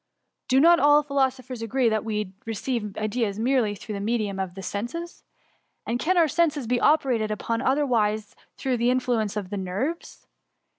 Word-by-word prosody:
Do 260 - +4
not 340 +3 +6
all 295 0 +5
philosophers 265 -3 -1
agree 240 +2 +1
that 220 -1 +1
we 210 -3 -3
receive 225 -1 -3
ideas 215 -1 -1
merely 230 -2 +1
through 210 +2 -8
the 200 - -4
medium 210 -2 -1
of 190 -2 -4
the 195 - -8
senses.*^ 245 - -5 0.6
And 235 +2 -1
can 360 +7 +1
our 335 -2 +5
senses 305 -3 +1
be 245 +1 0
operated 255 -8 +2
upon 230 +2 -2
otherwise 230 -7 +1
than - - -28 0.2
through 260 -3 -1
the 235 +1 +2
influence 240 -5 0
of 195 -2 -5
the 205 - -3
nerves 200 - -4
235 Hz, 170 wpm, -25 LUFS, 210-270 Hz, 0.6 s, not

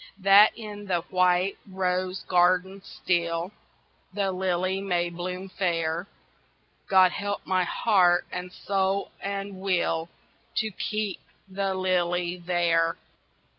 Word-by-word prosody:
That 200 +2 +6
in 210 -2 -8
the 180 -3 0
white 185 +1 +2
rose 185 0 -1
garden 185 +2 +2
still 170 0 -1 0.6
The 195 0 -1
lily 185 +1 -1
may 175 -3 0
bloom 180 +2 -5
fair 170 -2 -1 0.8
God 185 -2 +5
help 205 +2 -4
my 185 -1 +1
heart 180 -4 +3
and 180 0 -5
soul 195 +1 -1
and 200 0 -4
will 170 -3 0 0.5
To 220 0 0
keep 210 0 -3 0.3
the 195 0 -2
lily 180 -1 0
there. 170 -1 +1
185 Hz, 110 wpm, -26 LUFS, 175-195 Hz, 0.8 s, That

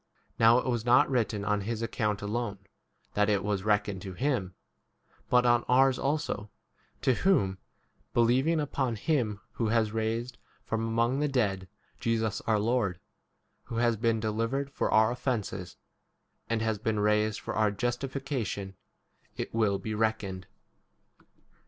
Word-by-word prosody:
Now 115 +1 +7
it 125 - 0
was 120 -3 0
not 125 +3 +4
written 110 -5 0
on 105 0 +1
his 115 +2 -3
account 105 -3 -1
alone 105 -1 -2 0.6
that 105 +1 +2
it 100 -2 +2
was 105 -1 0
24 105 - -7
reckoned 105 -2 +1
to 95 -1 -7
him, 110 -6 -1 0.7
but 125 0 +4
on 120 -1 +4
ours 130 0 +4
also, 140 -7 -2 0.5
to 130 - +4
whom, 100 - +2 0.5
believing 130 +8 +3
upon 135 -5 -1
him 110 -5 0
who 115 - -1
has 110 -1 +2
raised 115 +3 -2 0.3
from 115 0 -1
among 115 +3 +1
25 - - -1
the 150 -1 0
dead 95 -7 0 0.3
Jesus 115 -2 0
our 110 -1 +3
Lord, 105 -5 0 0.7
who 115 - -7
has 120 0 +2
been 115 0 +1
delivered 115 +6 -1
for - - -1
our 110 +1 +4
offences 120 -8 -3 0.7
and 115 -1 0
has 110 -2 0
been 110 0 -1
raised 105 0 +2
for - - -5
our 110 -1 +3
justi 120 +6 -2
fication, 130 -8 -4 0.6
it - - -4
will 110 -3 +2
be 110 +2 -5
reckoned. 105 -4 -1
115 Hz, 150 wpm, -29 LUFS, 105-125 Hz, 0.7 s, Now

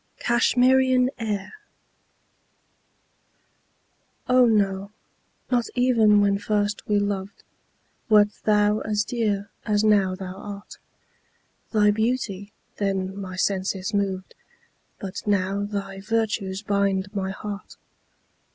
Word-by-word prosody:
(CASHMERIAN 255 +1 +3
AIR.) 210 -4 -3 2.7
Oh, 250 -1 +5
no 200 -3 +1 0.6
not 240 -2 +2
even 225 -5 +4
when 200 -1 +2
first 205 0 -1
we 210 - +2
loved, 200 0 -3 0.7
Wert 210 -1 +6
thou 210 0 +3
as 210 -1 0
dear 210 -4 -2
as 210 0 +1
now 200 -3 +3
thou 185 0 -7
art; 200 0 -9 0.9
Thy 210 -2 +4
beauty 215 -3 -2 0.3
then 195 -1 -1
my 190 -2 -6
senses 190 +1 -1
moved, 195 -2 -2 0.6
But 195 -1 -6
now 200 0 +1
thy 195 -1 -5
virtues 210 -2 -1
bind 200 -1 0
my 190 -2 -2
heart. 200 +1 -7
205 Hz, 100 wpm, -24 LUFS, 195-215 Hz, 2.7 s, Wert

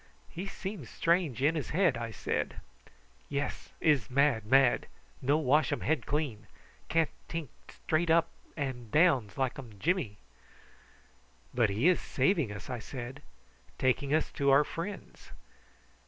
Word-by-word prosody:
"He 185 +4 -5
seems 195 - -6
strange 165 -8 +1
in 150 +3 +4
his 155 -3 -3
head," 170 -5 +3
I 115 -1 -4
said. 110 - -3 0.7
"Yes. 140 +1 -3
Iss 145 -8 +2
mad 130 -5 +2
mad. 135 +1 +4 0.3
No 140 +4 +3
wash 150 +1 +3
um 145 - -1
head 160 +1 0
clean. 140 -8 -2 0.4
Can't 165 -2 +2 0.2
tink 165 -4 -4 0.2
straight 160 +2 -1
up 165 0 +4 0.3
an 130 -5 -4
down 150 -3 +4
ums 100 - -18
like 135 0 -1 0.2
Jimmy." 115 - 0 1.4
"But 120 -4 +3
he 110 - +2
is 180 - +4
saving 160 - +1
us," 100 -2 -8
I 125 -2 -4
said. 130 +4 -7 0.6
"Taking 130 +2 +1
us 155 +1 +1
to 140 -1 +1
our 140 +2 +6
friends." 180 +6 -7
140 Hz, 140 wpm, -31 LUFS, 125-160 Hz, 1.4 s, our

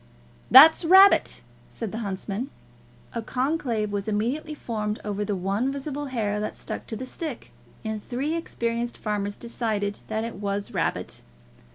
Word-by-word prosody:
"That's 305 +7 +9
rabbit," 380 +4 +6 0.3
said 225 -4 -5
the 225 - -4
huntsman. 200 +4 -4 0.6
A 230 - -2
conclave 250 -4 -1
was 200 0 -3
immediately 245 +9 -1
formed 215 -5 -3
over 210 0 -2
the 205 0 -1
one 200 +8 0
visible 280 +1 -4
hair 210 -5 -1
that 210 - -4
stuck - - -6
to 225 - -4
the 255 - -5
stick, 290 -1 -6 0.3
and 220 -1 -3
three 270 +5 -2
experienced 235 -7 -2
farmers 205 -1 -2
decided 215 -4 -2
that 220 0 -2
it 230 0 -5
was 200 0 -3
rabbit. - - -2
225 Hz, 150 wpm, -26 LUFS, 210-265 Hz, 0.6 s, That's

